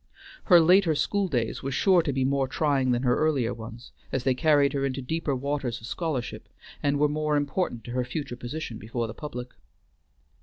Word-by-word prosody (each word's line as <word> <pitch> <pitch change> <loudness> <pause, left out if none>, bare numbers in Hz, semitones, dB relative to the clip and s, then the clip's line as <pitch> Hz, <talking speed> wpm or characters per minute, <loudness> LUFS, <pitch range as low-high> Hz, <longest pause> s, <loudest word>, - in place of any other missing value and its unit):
Her 175 -4 +7
later 175 0 +5
school 195 +7 0
days 120 -9 -1
were 135 - -3
sure 175 +7 +4
to 150 - -1
be 130 -1 0
more 135 0 +1
trying 135 -2 +1
than 125 0 +1
her 125 -1 +2
earlier 140 -6 +1
ones, 115 +2 -10 0.2
as 130 - -1
they 130 0 +3
carried 145 +1 +3
her 140 -1 -1
into 135 -1 -1
deeper 145 +2 -2
waters 135 -2 -2
of 115 - -11
scholarship, 145 -3 -4 0.3
and 145 0 +1
were 150 +1 +3
more 150 0 0
important 145 - -2
to 120 - -8
her 125 0 0
future 125 0 -5
position 120 -1 -6
before 115 +2 -3
the 110 - -6
public. 125 -3 -7
135 Hz, 195 wpm, -26 LUFS, 125-150 Hz, 0.3 s, Her